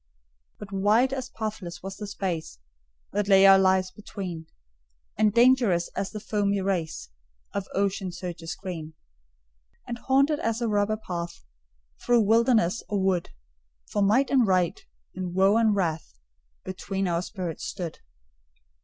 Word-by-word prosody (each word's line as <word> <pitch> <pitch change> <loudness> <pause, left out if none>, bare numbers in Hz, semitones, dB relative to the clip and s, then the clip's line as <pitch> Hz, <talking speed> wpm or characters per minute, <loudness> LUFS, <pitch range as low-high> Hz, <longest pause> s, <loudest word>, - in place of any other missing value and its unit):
But 205 -1 -10
wide 215 +7 +3
as 260 -2 -4
pathless 210 -6 -6
was 195 0 -6
the 210 - -6
space 175 - -4 0.5
That 205 0 -1
lay 195 -1 +6
our 195 0 +8
lives 185 -1 +3
between, 185 -5 -7 0.7
And 215 0 +3
dangerous 235 -7 +4
as 195 - -2
the 215 - -6
foamy 200 -1 0
race 180 - -2 0.4
Of 200 -1 -3
ocean 195 -1 0
surges 175 -2 -6
green. 165 -5 -7 0.9
And 240 0 -5
haunted 275 +4 +2
as 230 0 -1
a 235 - -1
robber 210 0 +1
path 175 - -6 0.6
Through 240 -1 +4
wilderness 225 -2 +3
or 205 - 0
wood; 190 -2 0 0.6
For 205 - 0
Might 225 +8 +3
and 255 -5 +4
Right, 185 -3 +1 0.3
and 180 -1 -5
Woe 195 +2 +4
and 220 -2 +3
Wrath, 160 - -2 0.5
Between 190 +1 -3
our 170 -1 0
spirits 180 -4 -5
stood. 175 -5 -5
195 Hz, 140 wpm, -26 LUFS, 180-215 Hz, 0.9 s, our